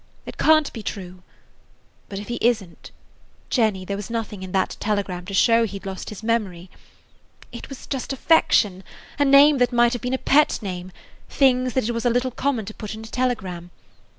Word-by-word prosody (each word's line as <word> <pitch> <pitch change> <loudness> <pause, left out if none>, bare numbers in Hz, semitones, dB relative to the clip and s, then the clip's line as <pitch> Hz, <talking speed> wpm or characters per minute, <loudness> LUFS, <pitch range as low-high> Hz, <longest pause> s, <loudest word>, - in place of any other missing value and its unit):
It - - -10
can't 310 -2 +4
be 225 - -6
true. 185 -3 -7 0.9
But 195 - -6
if 200 +1 -7
he 240 - -3
is 235 -3 +2
n't–Jenny, 190 +3 -4
there 200 - -3
was 205 +1 -6
nothing 225 -4 -4
in 190 -1 -7
that 190 0 0
telegram 200 -4 -2
to 200 - -6
show 230 +3 +4
he 200 -3 -3
'd 195 - -14
lost 190 -1 -6
his 210 0 -9
memory. 195 -6 -2 0.8
It 235 - -9
was 275 - -9
just 270 -1 -4
affection–a 265 - +1
name 280 +1 +6
that 245 0 +3
might 240 0 +3
have 245 - -4
been 250 +1 -1
a - - -1
pet 295 +3 +3
name, 185 -1 -5 0.4
things 255 -2 +2
that 260 -4 0
it - - 0
was 230 +1 -3
a - - +4
little 250 +2 0
common 250 -4 -1
to 215 - -8
put 215 -1 -7
in 220 - -9
a - - -10
telegram. 220 -8 -3
225 Hz, 195 wpm, -23 LUFS, 195-250 Hz, 0.9 s, name